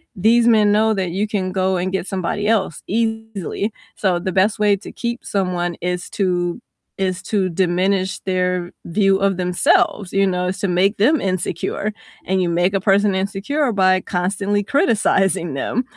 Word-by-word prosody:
these 230 +5 +3
men 215 -3 +5
know 220 +1 +3
that 190 -4 -2
you 200 +4 -1
can 195 -3 -2
go 190 0 0
and 180 +1 -2
get 190 -1 -2
somebody 190 +2 -2
else 200 -7 0
easily, 220 -2 -2 0.2
so 185 -4 +1
the 185 +2 -3
best 195 +4 +2
way 210 -1 +4
to 200 - -10
keep 235 0 -4
someone 180 -3 -1
is 180 +1 -3
to 180 +1 -1 0.4
is 185 -1 -2
to 195 -4 0
diminish 185 +2 0
their 180 -1 -1
view 195 +2 +2
of 195 -1 +1
themselves, 190 - +1
you 195 0 +3
know, 180 -1 -1
is 190 - -4
to 200 - -1
make 190 +4 +2
them 275 +9 +3
insecure, 185 +2 -2 0.3
and 190 0 +1
you 175 - 0
make 175 +3 +1
a 195 - 0
person 200 0 +3
insecure 210 +9 -1
by 185 -2 +3
constantly 200 +4 -1
criticizing 195 - +1
them, 230 - -1
195 Hz, 170 wpm, -20 LUFS, 180-210 Hz, 0.4 s, men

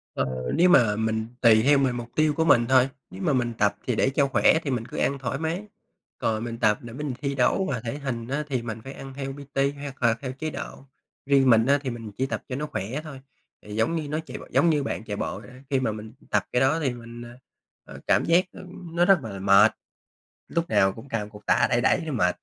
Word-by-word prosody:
Ờ, 65 -1 -2
nếu 180 +2 +4
mà 120 -10 +5
mình 110 0 -1
tùy 110 -3 +6
theo 145 +2 +5
mình, 135 -3 +1
mục 120 -1 -6
tiêu 155 -1 +3
của 160 +2 0
mình 120 -7 +5
thôi. 130 0 +5 0.2
Nếu 190 +1 -10
mà 170 -6 +1
mình 120 -2 0
tập 100 -1 +2
thì 125 - +1
để 130 - +2
cho 140 +1 +2
khỏe 145 +3 +4
thì 140 - -2
mình 120 -3 -2
cứ 120 - -9
ăn 140 - +1
thoải 130 -2 -3
mái, 165 +5 -2 0.5
còn 110 0 -1
mình 115 -1 -5
tập 105 -2 +3
để 120 -1 -9
mình 145 +1 -4
thi 140 -1 -2
đấu 135 +9 +2
mà 125 - -1
thể 120 +4 -4
hình, 120 -5 -4
á, 140 +4 -2
thì 130 -4 -1
mình 115 -1 -6
phải 135 - -8
ăn 135 -1 -9
theo 135 0 -5
PT 140 0 -2
hoặc 140 -2 -7
là 115 -1 +5
theo 130 -2 -4
chế 145 +4 -4
độ. 140 -2 -8 0.4
Riêng 135 -1 +4
mình, 115 -1 +5
á, 140 +2 +4
thì 135 - -3
mình 115 -3 -7
chỉ 130 - +1
tập 135 - -4
cho 125 - -3
nó 150 +3 -3
khỏe 115 +2 -4
thôi, 140 -4 -9 0.4
thì 105 0 -9
giống 115 +10 +1
như 155 -3 -3
nó 155 +2 -1
chạy - - -7
b - - -11
giống 170 - +4
như 150 -3 +2
bạn 135 - -4
chạy 105 -2 -5
bộ 95 - -3
vậy, 105 - -13
á, 130 +1 -15
khi 135 - +2
mà 125 -4 0
mình 110 +1 -8 0.2
tập 105 -2 +2
cái 125 - +2
đó 135 +5 +3
thì 135 -6 -1
mình, 120 0 -10 0.6
à, - - -12
cảm - - +3
giác, 170 +2 +4
ừm, 180 -2 -11
nó 175 +1 +4
rất 195 -2 +5
là 100 -4 -6
mệt, 100 +3 +6 0.8
lúc 170 0 -2
nào 95 0 +4
cũng 115 +6 -12
cầm 105 -3 -3
cục 105 -1 -14
tạ 120 - +3
đẩy 120 -1 +2
đẩy 130 - +3
nó 155 - -4
mệt. 90 -7 +1
130 Hz, 260 wpm, -25 LUFS, 115-145 Hz, 0.8 s, tùy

